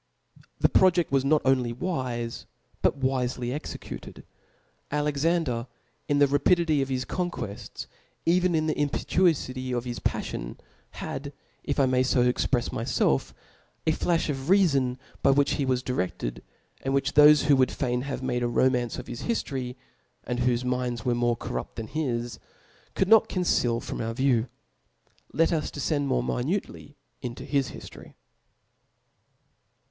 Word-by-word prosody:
The - - +4
projeft 180 -4 +3
was 135 -1 +3
not 150 +2 +3
only 130 -3 +2
wife, 125 -5 -3 0.3
but - - +2
wifely 130 -2 -1
exe 150 - -5
cutedL - - -9 0.7
Alexander, 145 -3 0 0.4
in 145 - +2
the 145 - +6
rapidity 150 +2 +3
of 135 - -2
his 130 -1 -1
conquefts, 120 - -4 0.4
even 180 +1 +3
in 155 0 +1
the 155 - +1
impetuofity 135 -4 0
of 120 - -3
his 120 -1 -4
paffion, - - -3 0.4
had, 140 +1 -5 0.3
if 140 - -1
I 135 - +5
may 130 -1 +2
fo 130 -1 +3
exprefs 125 0 +1
myfelf,^ 115 - 0 0.5
a 160 - +3
flalh 165 +1 +1
of 145 -3 -1
rcafon 140 -5 +2 0.2
by - - +4
whicb 140 +1 +4
he 140 - 0
was 130 -1 0
dire^ed, 90 - -3 0.4
and 135 0 -1
whfch 140 +1 0
thofe 150 0 +7
wha 140 -2 +6
would 130 -1 +3
fain 125 -2 -1
have 135 0 -4
made 125 -1 -1
a 120 - +1
romance 125 0 +1
of - - -6
his 120 - -7
hiilory, 130 - -2 0.5
and 125 0 -3
whofe 125 0 +1
minds 125 -2 -2
were 125 - +2
more 120 0 +1
corrupt - - -5
than 115 - -4
his, 120 -4 -3 0.6
could 190 - +1
not 220 +1 +6
con 185 - -1
ceal 120 -8 +2
from - - -5
our 115 0 -3
view. 130 -3 +2 0.8
Let 165 +1 +2
us 155 -2 -1
defcend 145 0 -1
more 130 -3 +1
mimnc 150 +11 -1
ly 145 - -13 0.3
into 125 +1 -6
his 140 -2 0
hiftory. - - -11
130 Hz, 155 wpm, -27 LUFS, 125-150 Hz, 0.8 s, thofe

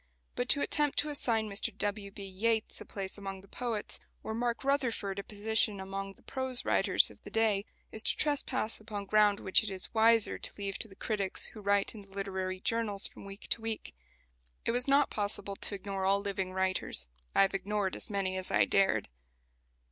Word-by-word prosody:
But 245 - -2
to 285 - +7
attempt 295 -1 +2
to 300 - +3
assign 230 -6 +1
Mr 205 +3 +1
W. 205 -1 -1
B. 200 0 -8
Yeats 220 +4 0
a - - -7
place 195 0 -3
among 195 -1 -5
the 195 - -18
poets, 235 -1 -2 0.2
or 220 - -3
"Mark 235 +2 -1
Rutherford" 240 -8 0
a - - -4
position 210 0 +1
among 195 +1 -4
the - - -24
prose 260 -2 -2
writers - - +3
of - - -18
the - - -9
day, 215 -3 +2 0.3
is 220 - -2
to - - 0
trespass 270 -6 0
upon 210 -2 -5
ground 210 0 +4
which 190 - +4
it 215 - -3
is 190 -1 -2
wiser 225 0 +4
to - - -5
leave 200 -1 -3
to 225 - +2
the 195 - -15
critics 200 -3 -1
who 215 - -9
write 200 0 +2
in 215 - -9
the 200 - -16
literary 190 -1 -3
journals 210 -1 0
from - - -6
week 195 +1 -9
to 230 - +1
week. 225 -1 -3 0.7
It - - +2
was 245 +2 0
not 280 +1 +4
possible 205 -1 -1
to 205 - -3
ignore 195 0 -4
all 195 +1 +4
living 195 -2 -2
writers. 185 - -1 0.3
I - - +7
have 195 - +1
ignored 200 0 -1
as - - -1
many 195 -2 -1
as 185 - -4
I - - +4
dared. 190 - +3
205 Hz, 200 wpm, -32 LUFS, 195-225 Hz, 0.7 s, to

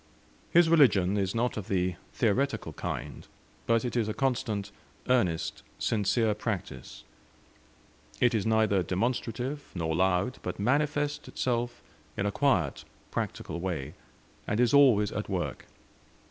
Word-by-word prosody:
His 175 0 +5
religion 105 - +5
is 100 0 -1
not 120 +1 0
of 105 - -5
the 90 -1 0 0.2
theoretical 125 +5 0
kind, - - -5 0.4
but 115 +1 +2
it 125 - -3
is 115 -3 +1
a 110 - -3
constant, 110 -7 -1 0.4
earnest, 100 -11 +1 0.2
sincere 110 +1 +1
practice. 105 -3 -5 1.2
It 125 -1 +4
is 110 -3 +1
neither 110 -3 +3
demonstrative 120 - -2
nor 80 -2 -1
loud, 95 +7 +1
but - - -4
manifests 145 +5 0
itself 120 -1 -2 0.3
in 100 - 0
a 105 - +1
quiet, 100 - +1 0.3
practical 85 - -3
way, 80 -6 -3 0.5
and 105 - 0
is 120 -2 +3
always 125 -8 +5
at - - -4
work. - - -3
110 Hz, 130 wpm, -29 LUFS, 95-125 Hz, 1.2 s, His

